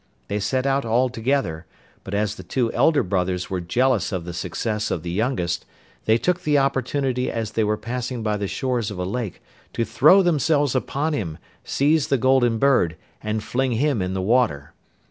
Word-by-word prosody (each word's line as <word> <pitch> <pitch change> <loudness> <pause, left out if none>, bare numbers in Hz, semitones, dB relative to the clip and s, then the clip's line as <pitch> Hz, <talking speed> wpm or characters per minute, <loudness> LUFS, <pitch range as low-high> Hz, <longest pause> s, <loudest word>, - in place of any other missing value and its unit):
They 105 - -1
set 130 +6 -1
out 135 0 +1
all 120 +3 +2
together, 115 - -1 0.4
but 100 - -5
as 105 0 0
the 100 - -10
two 115 +6 -1
elder 145 +5 +3
brothers 90 -1 -1
were 95 -2 -1
jealous 120 +7 +1
of 90 -4 -3
the 90 - -6
success 105 +5 -2
of 80 - -2
the 85 - -4
youngest, 90 -5 -1 0.4
they 110 +1 +4
took 180 +7 0
the 150 -4 +2
opportunity 135 -1 0
as 110 -2 -3
they 110 0 0
were 105 0 0
passing 125 0 -4
by 105 -1 0
the 100 -1 -2
shores 125 -1 -1
of 100 - -7
a 90 - -2
lake 105 +1 -4 0.3
to 115 - 0
throw 185 +12 +5
themselves 150 -4 +2
upon 140 +4 -1
him, 85 - -3 0.3
seize 150 +1 +2
the 135 - +2
Golden 130 -2 +3
Bird, 120 -10 +3 0.3
and 110 0 -2
fling 130 0 0
him 135 -1 +1
in 90 +1 -2
the 95 - -1
water. 95 - +1
115 Hz, 190 wpm, -23 LUFS, 95-135 Hz, 0.4 s, throw